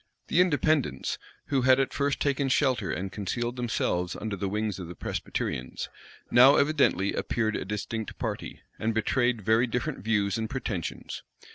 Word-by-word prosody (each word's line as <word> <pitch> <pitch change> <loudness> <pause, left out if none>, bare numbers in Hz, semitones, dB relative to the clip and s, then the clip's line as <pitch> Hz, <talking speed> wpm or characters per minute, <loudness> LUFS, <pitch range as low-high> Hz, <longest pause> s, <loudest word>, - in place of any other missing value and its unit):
The 175 - +5
Independents, 155 - +1 0.3
who 135 -2 +2
had 130 +1 +5
at 135 - 0
first 140 -1 0
taken 140 -1 +1
shelter 130 -6 +2
and 95 +1 -3
concealed 120 +4 -2
themselves 100 -7 -1
under 110 -2 -3
the 100 0 -2
wings 105 -1 -2
of 90 - -6
the 85 - -8
Presbyterians, 65 -4 -3 0.4
now 130 +4 +8
evidently 140 - +3
appeared 110 -2 0
a - - -3
distinct 105 +2 -4
party, - - -4 0.2
and 110 0 0
betrayed 120 +1 +1
very 110 +4 +3
different 125 0 -2
views 105 0 +1
and 110 -1 -2
pretensions. 110 - -4
115 Hz, 155 wpm, -28 LUFS, 100-130 Hz, 0.4 s, now